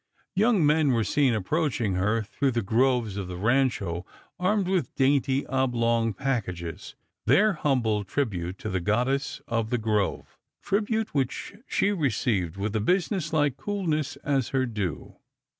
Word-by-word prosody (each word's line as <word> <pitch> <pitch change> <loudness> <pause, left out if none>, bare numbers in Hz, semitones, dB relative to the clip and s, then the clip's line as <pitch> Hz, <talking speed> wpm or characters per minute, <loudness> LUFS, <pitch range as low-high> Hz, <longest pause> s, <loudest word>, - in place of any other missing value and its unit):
Young 205 -4 +3
men 150 -2 +3
were 115 -2 +2
seen 135 0 +2
approaching 120 - 0
her 105 +5 +1
through 130 +5 -1
the 115 -1 0
groves 115 -1 +1
of 100 -2 -3
the 90 -1 -6
Rancho 105 -6 +1 0.4
armed 190 +1 +1
with 180 -9 -1
dainty 135 0 +2
oblong 115 -3 +1
packages, 90 - -3 0.3
their 215 +1 +5
humble 120 - +1
tribute 95 -6 -2
to 110 - -5
the 95 -1 -1
goddess 125 +8 0
of 115 -2 -1
the 125 - +1
grove, 105 -3 -1 0.2
tribute 220 +2 0
which 135 +4 -2
she 200 - +1
i - - 0
eceived 110 - 0
with 105 +2 -2
a 110 - +1
business 180 - 0
like 145 -4 +1
coolness, 155 -8 -2
as 135 -4 0
her 130 -1 +1
due. 105 - -4
125 Hz, 150 wpm, -26 LUFS, 105-150 Hz, 0.4 s, their